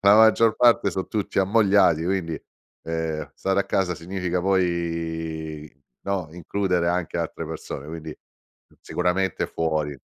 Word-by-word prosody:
la 100 +1 +7
maggior 110 0 +5
parte 120 -5 +4
so 95 +1 -3
tutti 105 -3 -2
ammogliati, 95 -5 +4
quindi, 90 -3 -1 0.4
uhm, 80 -1 -3
stare 95 0 +1
a - - -1
casa 90 -2 0
significa 90 +1 -3
poi, 80 -4 -1 0.3
no, 95 -5 -2
includere 90 0 -1
anche 85 -1 -1
altre 85 -1 -3
persone, 75 -3 -6
quindi 80 0 -7 0.7
sicuramente 90 +1 0
fuori. 80 -2 -1
90 Hz, 125 wpm, -24 LUFS, 80-95 Hz, 0.7 s, la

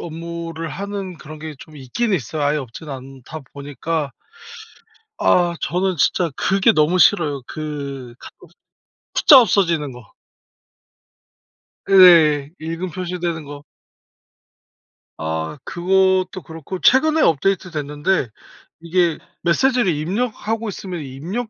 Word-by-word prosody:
업무를 165 0 -6
하는 195 -1 -5
그런 155 +1 -10
게 155 0 -7
좀 155 +3 -14
있긴 170 - -2
있어요. 150 - -2
아예 145 +1 +2
없진 140 +2 -7
않다 135 +2 -9
보니까 145 +1 -4 1.1
아 175 -1 +3
저는 185 +1 0
진짜 170 +4 +2
그게 195 +3 +3
너무 160 +1 +2
싫어요 150 -9 +3
그 140 -5 -6
카톡 - - -11 0.8
숫자 275 -3 +8
없어지는 170 - +1
거. 125 0 -12 1.9
예. 165 -7 +7
읽음 165 +3 -5
표시되는 175 -2 -4
거. 145 0 -10 1.5
아 80 - -4
그것도 185 +2 +1
그렇고 165 +3 -7
최근에 310 - +4
업데이트됐는데 155 -3 0 0.5
이게 170 0 0 0.2
메시지를 240 +2 +2
입력하고 220 +6 -2
있으면 185 -3 -6
입력 170 - -5
165 Hz, 235 characters per minute, -20 LUFS, 145-190 Hz, 1.9 s, 숫자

